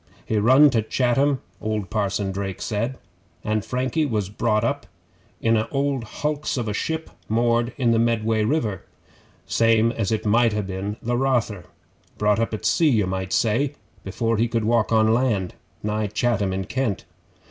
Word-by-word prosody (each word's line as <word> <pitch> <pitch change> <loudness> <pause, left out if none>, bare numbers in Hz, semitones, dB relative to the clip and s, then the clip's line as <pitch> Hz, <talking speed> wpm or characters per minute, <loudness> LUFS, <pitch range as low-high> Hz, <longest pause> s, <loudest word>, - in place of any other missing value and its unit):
He 110 - 0
run 130 +7 +6
to 115 -3 +2
Chatham, 130 +4 +1 0.2
old 110 -2 -3
Parson 100 -2 -1
Drake 95 -1 -4
did, 115 +4 -1 0.5
an' 110 0 0
Frankie 130 +7 -1
was 105 -6 -1
brought 105 +1 0
up 115 - -1 0.5
in 115 0 +2
a 110 0 0
old 140 -2 -1
hulks 150 +5 -3
of 120 -3 -2
a 105 - -1
ship 160 +8 -3 0.2
moored 120 +1 +2
in 120 -4 +2
the 115 - +3
Medway 115 -1 +1
river, 110 - -1 0.6
same 115 0 +3
as 115 -4 -2
it 110 - -1
might 115 +1 +3
ha' 105 -1 -1
been 95 +2 -4
the 120 +1 0
Rother. 120 - 0 0.5
Brought 105 0 +2
up 115 - 0
at 110 - -5
sea, 165 -2 +3
you 110 -7 +2
might 95 0 -3
say, 130 +6 +1 0.3
before 115 +4 -1
he 115 +2 +2
could 115 -1 -1
walk 115 0 +2
on 110 0 +4
land 115 -7 0 0.3
nigh 105 0 -1
Chatham 105 -1 0
in 95 0 -2
Kent. 120 - -2
115 Hz, 170 wpm, -23 LUFS, 105-120 Hz, 0.6 s, run